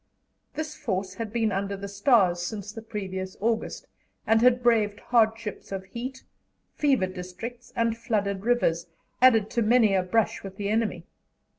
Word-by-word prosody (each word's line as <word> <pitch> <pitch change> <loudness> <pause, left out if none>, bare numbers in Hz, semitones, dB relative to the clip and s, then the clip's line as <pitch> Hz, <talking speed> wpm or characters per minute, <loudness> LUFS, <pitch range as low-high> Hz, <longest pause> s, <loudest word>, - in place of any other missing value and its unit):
This 310 -1 -4
force 190 -3 -3
had 225 -2 -5
been 225 -2 +1
"under 200 +1 -2
the 200 +1 -6
stars" 200 -4 +3
since 205 +3 -5
the 225 - -8
previous 190 -4 -5
August, 225 +2 -1 0.4
and 225 0 +4
had 245 0 +4
braved 215 -4 +3
hardships 225 -3 0
of 195 -1 -4
heat, 250 +6 -7 0.5
fever 275 -9 +2
districts, 185 +7 -8
and 230 -1 +1
flooded 200 -4 -1
rivers, 210 -9 +1 0.3
added 225 -5 +5
to 235 - +1
many 225 -2 +4
a 190 - +3
brush 185 +2 0
with 195 -1 -9
the 200 -1 -2
enemy. 210 -6 0
215 Hz, 155 wpm, -26 LUFS, 195-235 Hz, 0.5 s, added